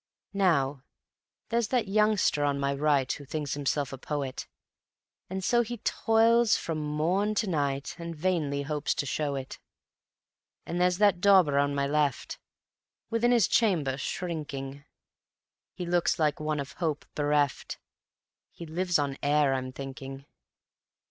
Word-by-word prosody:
Now, 145 -9 +1 0.7
there's 235 -1 +1
that 245 -5 0
youngster 210 -7 +2
on 140 -1 +1
my 140 0 0
right 140 -2 +1
Who 145 - -5
thinks 145 0 -4
himself 140 -1 -1
a 135 - -7
poet, 140 -2 -4 0.8
And 190 +1 -4
so 240 +4 +3
he 240 +1 -4
toils 225 +1 +3
from 160 -2 -3
morn 165 +8 0
to 210 +1 0
night 140 -5 -1
And 170 0 -6
vainly 150 -4 -1
hopes 150 +1 -1
to - - -2
show 145 +1 -2
it; 135 -1 -6 1.1
And 175 +1 -2
there's 180 0 +3
that 200 -3 +3
dauber 185 -8 +5
on 145 0 +1
my 140 0 +1
left, 145 -3 -1 0.7
Within 230 +1 +2
his 240 -3 +4
chamber 170 - +2
shrinking 140 -2 -5 0.9
He 180 - -4
looks 175 0 +1
like 150 -2 +1
one 155 -1 -2
of 140 0 -5
hope 155 -3 -1
bereft; 145 -2 0 0.7
He 170 - -10
lives 175 +2 0
on 140 -2 -2
air, 145 -1 +3
I'm 130 -1 -3
thinking. 135 +1 -8
150 Hz, 140 wpm, -28 LUFS, 140-185 Hz, 1.1 s, dauber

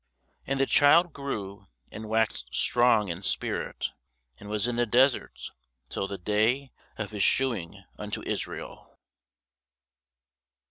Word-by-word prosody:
And 135 0 -1
the 135 - +4
child 160 +5 +5
grew, 100 -8 -5 0.2
and 110 0 -8
waxed 110 - 0
strong 115 -4 +4
in 85 +2 -4
spirit, - - -2 0.5
and 100 - -10
was 105 +1 0
in 120 - -1
the 120 0 +2
deserts 130 +4 +2 0.4
till 95 - -3
the 100 - -5
day 110 +8 +1 0.3
of 105 -1 -4
his 105 -2 -3
shewing 115 -8 0 0.2
unto - - -4
Israel. - - -5
110 Hz, 125 wpm, -28 LUFS, 100-130 Hz, 0.5 s, child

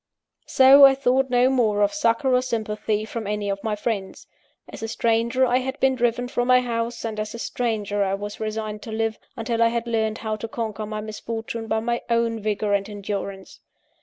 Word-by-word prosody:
So 270 +2 +7
I 270 -1 +9
thought 265 0 +1
no 245 0 +4
more 215 -5 +2
of 205 - +1
succour 260 -2 +1
or 250 - +4
sympathy 215 -3 -2
from 220 -1 -5
any 210 -1 -2
one - - +1
of - - -19
my 220 -1 -1
friends. 205 -2 -4 0.4
As - - -10
a 225 - -3
stranger 235 +3 +1
I 250 0 +2
had 265 +2 -4
been 265 0 +3
driven 245 -1 0
from 245 0 -1
my 255 0 +6
home, 230 -1 -1
and 220 -2 -4
as 215 +1 -4
a - - -5
stranger 215 -4 -1
I 195 0 0
was 205 +1 -7
resigned 215 -1 -4
to 225 - -8
live, 225 0 -2 0.2
until 230 0 -1
I 230 - +6
had 235 0 -2
learnt 220 -2 -1
how 220 -1 -3
to 225 - -5
conquer 220 -2 -4
my 215 0 -4
misfortune 225 +1 -5
by 220 0 0
my 235 +1 -1
own 230 -1 +1
vigour 210 -1 -1
and 200 +1 0
endurance. 200 -1 -6
225 Hz, 210 wpm, -23 LUFS, 215-240 Hz, 0.4 s, I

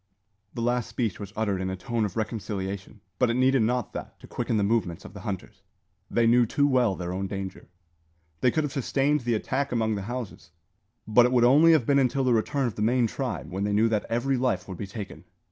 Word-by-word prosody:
The 115 - -2
last 120 0 0
speech 115 -6 -2
was 100 -2 -7
uttered 100 -4 -1
in 95 - -2
a 95 - -3
tone 110 +5 -2
of 100 +1 -5
reconciliation; 100 -2 -4 0.2
but 125 - +3
it 115 - +1
needed 130 0 +3
not 120 +1 0
that - - -8
to - - -11
quicken 115 - -2
the 105 - +2
movements 100 -6 0
of - - -10
the 100 - -9
hunters. 95 -1 -6 0.5
They 120 - +2
knew 120 +1 +5
too 145 +5 +2
well 125 -7 +2
their 90 0 -4
own 95 +1 -2
danger. 95 -2 -6 0.7
They 125 - +4
could 155 +5 0
have 145 -2 -3
sustained 140 +2 +1
the 120 -1 0
attack 140 +6 -2
among 110 -2 +1
the 100 - -3
houses, 120 -4 -6 0.6
but 120 +3 +6
it - - -3
would 125 -2 +4
only 150 +7 +6
have 150 -7 +3
been 140 +2 +3
until 135 +1 +1
the 125 -1 +3
return 135 +5 +1
of 120 - -1
the - - -6
main 120 +3 +3
tribe, 115 -6 -4
when 95 +2 -2
they 100 0 0
knew 110 +2 +3
that 110 -2 0
every 130 +3 0
life 120 -7 0
would 95 -3 -8
be 100 - -4
taken. 100 0 -8
115 Hz, 230 wpm, -26 LUFS, 100-125 Hz, 0.7 s, but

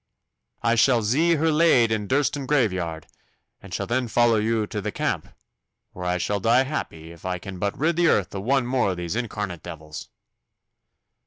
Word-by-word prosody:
I 115 -1 +3
shall 120 0 +3
zee 155 +11 +3
her 160 +1 +1
laid 150 -8 +4
in 105 -2 -1
Durston 140 +1 0
graveyard, 95 - 0 0.6
and 100 - -13
shall - - -2
then 125 +1 -1
vollow 115 0 +3
you 110 0 0
to - - -5
t' - - -3
camp, - - -2 0.6
where 90 - -7
I 90 0 +1
shall 100 +3 -1
die 115 +6 +4
happy 80 - -5
if 85 -1 -15
I 90 -1 -2
can 95 +1 -8
but 100 +1 -2
rid 160 +3 +1
the 175 -1 +4
earth 100 - +2
o' 100 - -4
one 130 +4 +1
more 125 -4 +1
o' 95 - -1
these 85 +2 -4
incarnate 105 -7 -4
devils. 75 -1 -9
110 Hz, 185 wpm, -24 LUFS, 95-130 Hz, 0.6 s, laid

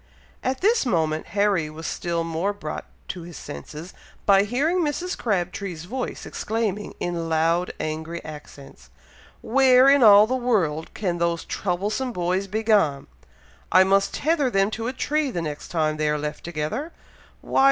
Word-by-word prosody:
At 260 +1 -1
this 450 +4 +3
moment, 160 - 0
Harry 200 -6 +1
was 160 +2 -9
still 170 -1 -2
more 165 +5 -1
brought 200 - -6 0.2
to 180 - -5
his 170 -3 -9
senses, 150 - -9 0.3
by 200 0 +5
hearing 290 - +1
Mrs. 345 +3 -1
Crabtree's 180 -4 -2
voice, 255 +7 -5
exclaiming, 210 -2 -3
in 170 -2 -3
loud 165 +2 +1
angry 160 +2 -4
accents, 140 - -11 0.5
"Where 260 +1 +5
in 280 0 +5
all 210 -2 +8
the 245 - -2
world 200 -12 0
can 180 -5 -2
those 170 -1 0
troublesome 205 +7 -2
boys 180 +2 -1
be 215 +3 -2
gone! 180 -11 +2 0.7
I 185 +1 +7
must 195 +1 +2
tether 300 -3 +1
them 195 -2 +2
to 225 +1 -3
a 255 - -2
tree 295 +2 0
the 180 - -3
next 150 -3 -5
time 155 -2 0
they 155 0 +1
are 150 - +1
left 150 0 -5
together! 175 - -3 0.5
Why! - - -1
190 Hz, 160 wpm, -24 LUFS, 165-235 Hz, 0.7 s, all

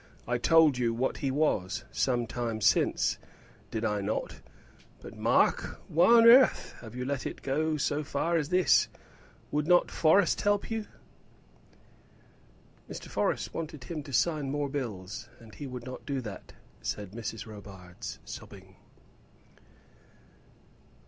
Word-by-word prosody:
I 120 0 0
told 160 -2 +5
you 115 -2 +1
what 130 +3 -1
he 135 - -1
was, 130 -10 0
some 120 -2 0
time 115 -1 -3
since; 110 0 +2 0.5
did 115 0 -3
I 105 -2 0
not? 100 +2 -3 0.6
But, - - -11
Mark, - - +1
why 175 +8 +5
on 230 0 +7
earth 250 +3 +6
have 115 0 -10
you 125 0 -3
let 140 -1 -2
it - - -8
go 155 +3 0
so 145 +1 -1
far 165 +4 -1
as 155 -3 0
this? 180 -1 +4 0.6
Would 150 +1 0
not 175 0 +4
Forrest 170 +4 +3
help 205 +1 +1
you?" 220 -2 -3 2.0
"Mr. - - -8
Forrest - - -1
wanted 155 -4 -5
him 160 0 -5
to 145 -1 -10
sign 150 +1 +1
more 145 0 -1
bills, 110 -6 -5
and 110 -2 -15
he 145 - -7
would 125 -2 -7
not 130 0 -8
do 140 -2 -1
that," 105 -5 -9 0.3
said 100 -3 -4
Mrs. 110 -1 -6
Robarts, 100 -5 -9
sobbing. - - -11
135 Hz, 140 wpm, -29 LUFS, 115-155 Hz, 2.0 s, on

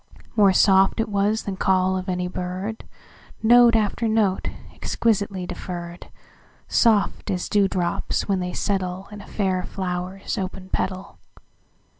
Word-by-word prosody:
More 205 -3 +6
soft 195 +2 +4
it 225 - 0
was 205 +2 +1
than 195 -2 -4
call 185 0 +2
of 185 +1 -4
any 180 0 -1
bird, 185 +4 -5 0.6
Note 240 +1 +7
after 220 +1 +1
note, 215 -4 +1 0.3
exquisitely 200 -4 -1
deferr'd, 175 -1 -7 0.6
Soft 215 -3 +2
as 180 -3 -1
dew 205 -2 +3
drops 175 -3 -1
when 195 -2 +1
they 180 0 -2
settleIn 195 +1 -3
a - - -15
fair 190 -3 -1
flower's 180 +1 -4
open 190 0 -5
petal. 185 0 -3
190 Hz, 130 wpm, -23 LUFS, 185-205 Hz, 0.6 s, Note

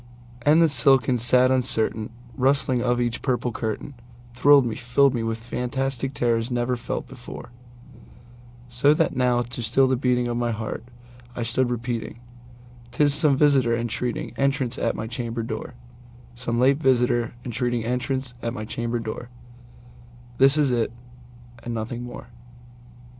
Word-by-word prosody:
And 155 +6 +5
the - - +5
silken 130 -2 +4
sad 125 +2 +5
uncertain 115 -4 0 0.3
rustling 135 -1 +2
of 120 0 +1
each 120 -1 -1
purple 125 -2 -1
curtainThrilled 120 +4 0
me—filled 125 +4 +2
me 120 - -1
with 115 0 -2
fantastic 130 +3 -3
terrors 115 -1 0
never 120 0 0
felt 120 - -5
before; 125 - -10 1.2
So 125 +5 +3
that 165 -1 0
now, 125 -1 +2
to 120 +1 -5
still 120 +4 +3
the 130 0 +2
beating 125 -1 +1
of 120 0 -2
my 120 0 0
heart, 110 0 -4 0.5
I 120 - -3
stood 120 +2 +1
repeating"'T 120 0 -8
is 145 -1 +4
some 150 -2 +4
visitor 135 -5 +3
entreating 120 0 -3
entrance 135 -2 0
at - - 0
my 110 - -4
chamber 115 0 -4
door, 110 +2 -6 0.6
Some 120 -1 -2
late 135 +2 +4
visitor 120 -3 +2
entreating 120 -1 -1
entrance 125 +1 -2
at 115 0 -3
my 110 - -5
chamber 120 +2 -3
door:This 120 +2 -4
it - - +4
is 120 -2 +1 0.7
and 120 -1 -5
nothing 115 +2 -4
more." 120 0 -9
120 Hz, 140 wpm, -24 LUFS, 120-130 Hz, 1.2 s, And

